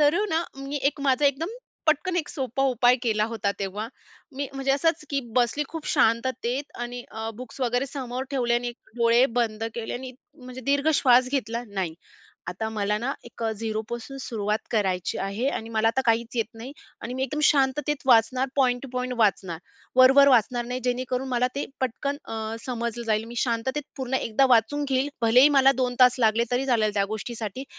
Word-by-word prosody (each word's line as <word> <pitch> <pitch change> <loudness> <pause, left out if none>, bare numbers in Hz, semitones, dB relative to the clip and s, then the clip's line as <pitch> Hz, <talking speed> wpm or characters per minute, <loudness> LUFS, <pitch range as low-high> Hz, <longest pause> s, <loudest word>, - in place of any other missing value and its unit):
तर 295 +1 +5
अ, - - +1
ना, 325 +1 +1
मी 275 +1 -5
एक 295 - -14
माझा 270 +3 +3
एकदम 280 +4 0 0.4
पटकन 315 +4 +2
एक 315 -4 -1
सोपा 265 -2 -2
उपाय 245 0 +4
केला 215 -3 +1
होता 220 -3 -2
तेव्हा. 200 +2 -3 0.5
मी 280 0 -2
म्हणजे 270 0 -1
असंच 320 +3 +1
की 280 -1 0 0.2
बसली 250 +4 +2
खूप 325 -1 -7
शांततेत 245 +3 +1 0.2
आणि 240 0 -5
अ, 220 0 -5
बुक्स 255 +2 -10
वगैरे 245 +1 +1
समोर 260 -2 -5
ठेवले 240 -3 +1
आणि 240 0 0
एक 240 - -13
डोळे 235 +2 +5 0.2
बंद 225 -1 -1
केले 235 -2 -4
आणि 255 +1 -6 0.2
म्हणजे 255 -3 -10
दीर्घ 285 +2 +2
श्वास 255 -2 +5
घेतला. 235 -3 -2
"नाही, 190 -5 -3 0.5
आता 210 +5 -3
मला 210 -1 -1
ना 250 +5 -2
एक 235 - -10
झिरोपासून 225 +4 -5
सुरुवात 215 -4 -2
करायची 190 -5 0
आहे 200 +7 -1
आणि 225 -5 -4
मला 220 0 +2
आता 235 +4 +1
काहीच 230 +1 +1
येत 230 - +2
नाही 235 +4 -8 0.3
आणि 245 - -5
मी 260 - -2
एकदम 300 +3 -2
शांततेत 290 +1 +2
वाचणार, 255 +2 +4
पॉइंट 250 -2 +2
टू 275 - -7
पॉइंट 250 0 -2
वाचणार, 190 -6 +1 0.4
वर-वर 270 +2 +7
वाचणार 240 -1 +3
नाही, 250 +1 -3
जेणेकरून 255 +1 -1
मला 250 -1 +1
ते 280 - -2 0.2
पटकन 265 +3 -2
अ, 220 0 -4
समजलं 235 -1 -3
जाईल. 215 0 +1
मी 235 +1 -10
शांततेत 255 +5 -1
पूर्ण 265 -1 -3
एकदा 265 +1 +2
वाचून 245 +5 +3
घेईल. 265 +1 +1
भलेही 245 +5 +6
मला 270 0 +6
2 250 -1 0
तास 250 -1 +7
लागले, 225 0 +3
तरी 255 +2 +1
चालेल 220 -5 +2
त्या 200 -1 +2
गोष्टीसाठी. 225 +2 -5
245 Hz, 185 wpm, -25 LUFS, 225-270 Hz, 0.5 s, वर-वर